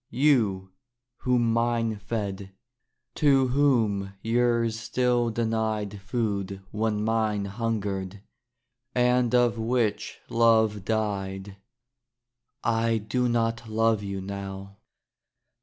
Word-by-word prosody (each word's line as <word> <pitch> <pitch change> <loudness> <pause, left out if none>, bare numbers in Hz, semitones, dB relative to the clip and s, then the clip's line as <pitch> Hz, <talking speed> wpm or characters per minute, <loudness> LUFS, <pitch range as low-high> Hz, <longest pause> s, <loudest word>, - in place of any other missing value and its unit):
You, 110 -9 +2 0.5
whom 120 -2 +1
mine 115 -1 0
fed; 100 -3 -4 0.6
to 135 -4 +3
whom 115 -8 +1
yours 115 0 +1
still 120 0 +1
denied 110 -3 -2
Food 100 -3 -3
when 105 -1 -1
mine 110 -2 0
hungered; 100 -2 -3 0.7
and 125 -1 +3
of 120 -2 +3
which 110 -3 -1
love 110 -3 +3
died 100 -3 -2 1.1
I 115 0 +1
do 120 +4 -1
not 115 -1 -1
love 110 -1 +2
you 100 -1 -4
now. 100 0 -7
110 Hz, 90 wpm, -26 LUFS, 100-120 Hz, 1.1 s, to